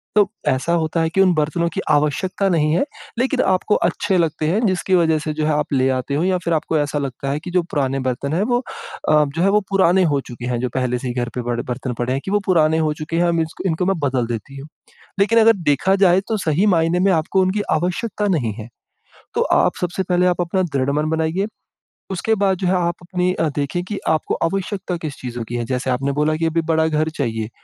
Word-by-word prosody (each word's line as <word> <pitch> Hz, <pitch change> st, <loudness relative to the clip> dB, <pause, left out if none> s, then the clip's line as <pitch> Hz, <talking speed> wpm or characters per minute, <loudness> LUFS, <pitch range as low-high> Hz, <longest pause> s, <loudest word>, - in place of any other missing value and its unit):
तो 205 Hz, -2 st, +4 dB, 0.2 s
ऐसा 130 Hz, +6 st, +1 dB
होता 165 Hz, 0 st, 0 dB
है 165 Hz, -, +1 dB
कि 195 Hz, +4 st, +2 dB
उन 185 Hz, -2 st, +4 dB
बर्तनों 155 Hz, +2 st, 0 dB
की -, -, -2 dB
आवश्यकता 150 Hz, +7 st, +1 dB
नहीं 155 Hz, -3 st, +2 dB
है, 175 Hz, -, +2 dB, 0.4 s
लेकिन 260 Hz, +1 st, +1 dB
आपको 190 Hz, +2 st, +2 dB
अच्छे 195 Hz, -2 st, 0 dB
लगते 160 Hz, -2 st, 0 dB
हैं, 210 Hz, +8 st, +1 dB
जिसकी 185 Hz, -1 st, +1 dB
वजह 160 Hz, -3 st, +3 dB
से 155 Hz, 0 st, -3 dB
जो 155 Hz, 0 st, -1 dB
है 155 Hz, -, +1 dB
आप 150 Hz, 0 st, -1 dB
ले 130 Hz, 0 st, +2 dB
आते 130 Hz, +1 st, -2 dB
हो 155 Hz, -, +1 dB
या 185 Hz, 0 st, +2 dB
फिर 170 Hz, -, +1 dB
आपको 160 Hz, 0 st, 0 dB
ऐसा 145 Hz, 0 st, -1 dB
लगता 135 Hz, 0 st, -4 dB
है 145 Hz, -, -1 dB
कि 175 Hz, +3 st, -8 dB
जो 180 Hz, 0 st, +3 dB
पुराने 135 Hz, -2 st, 0 dB
बर्तन 130 Hz, +3 st, -2 dB
हैं 175 Hz, -, +1 dB
वो 240 Hz, +2 st, +1 dB, 0.5 s
अ, 150 Hz, -1 st, +5 dB
जो 165 Hz, -, 0 dB
है 195 Hz, -, +4 dB
वो 210 Hz, +1 st, +3 dB
पुराने 190 Hz, -1 st, +4 dB
हो 145 Hz, -5 st, +2 dB
चुके 120 Hz, -1 st, -9 dB
हैं, 120 Hz, -1 st, -1 dB
जो 125 Hz, +1 st, -1 dB
पहले 125 Hz, -1 st, 0 dB
से 130 Hz, -, -5 dB
ही 120 Hz, -, -2 dB
घर 120 Hz, -1 st, -2 dB
पे 125 Hz, -, -2 dB
पड़ 120 Hz, 0 st, -2 dB
बर्तन 125 Hz, 0 st, -4 dB
पड़े 120 Hz, +1 st, -1 dB
हैं 135 Hz, -, -2 dB
कि 190 Hz, -, -3 dB
वो 205 Hz, -, +3 dB
पुराने 160 Hz, -3 st, +3 dB
हो 155 Hz, -1 st, +1 dB
चुके 155 Hz, +1 st, -5 dB
हैं, 175 Hz, -, +3 dB
हम 170 Hz, -1 st, +1 dB
इस 160 Hz, 0 st, -4 dB
इनको 180 Hz, 0 st, 0 dB
मैं 190 Hz, -3 st, 0 dB
बदल 130 Hz, -4 st, 0 dB
देती 120 Hz, +4 st, -6 dB
हूँ। 140 Hz, -, -9 dB, 0.5 s
लेकिन 210 Hz, +4 st, +4 dB
अगर 225 Hz, 0 st, +6 dB, 0.2 s
देखा 185 Hz, +7 st, +3 dB
जाए 185 Hz, -1 st, +5 dB
तो 225 Hz, -, 0 dB
सही 165 Hz, +1 st, +1 dB
मायने 170 Hz, -2 st, +2 dB
में 195 Hz, -, +4 dB
आपको 170 Hz, +3 st, +1 dB
उनकी 190 Hz, +3 st, +1 dB
आवश्यकता 185 Hz, +6 st, -1 dB
नहीं 140 Hz, -, 0 dB
है, 110 Hz, -1 st, -7 dB, 0.7 s
तो -, -, +2 dB
आप -, -, +2 dB
सबसे 180 Hz, +2 st, -1 dB
पहले 180 Hz, 0 st, +3 dB
आप 180 Hz, 0 st, +1 dB
अपना 175 Hz, +2 st, 0 dB
दृढ़मन 140 Hz, +3 st, 0 dB
बनाइए, 160 Hz, +5 st, 0 dB, 0.6 s
उसके 205 Hz, +4 st, 0 dB
बाद 190 Hz, -2 st, +2 dB
जो 185 Hz, -, -2 dB
है 185 Hz, -, +2 dB
आप 175 Hz, -1 st, 0 dB
अपनी 180 Hz, +1 st, -1 dB, 0.2 s
देखें 145 Hz, +5 st, -2 dB
कि 205 Hz, +2 st, -4 dB
आपको 155 Hz, -1 st, 0 dB
आवश्यकता 190 Hz, +1 st, -2 dB
किस 155 Hz, -4 st, -6 dB
चीज़ों 120 Hz, -2 st, -5 dB
की 120 Hz, -, -4 dB
है? 120 Hz, -, -1 dB
जैसे 130 Hz, +2 st, -2 dB
आपने 135 Hz, +2 st, 0 dB
बोला 150 Hz, +1 st, +2 dB
कि 165 Hz, -, -1 dB
अभी 165 Hz, +1 st, +1 dB
बड़ा 160 Hz, -1 st, +2 dB
घर 155 Hz, 0 st, 0 dB
चाहिए, 115 Hz, -5 st, -2 dB
160 Hz, 240 wpm, -20 LUFS, 140-185 Hz, 0.7 s, अगर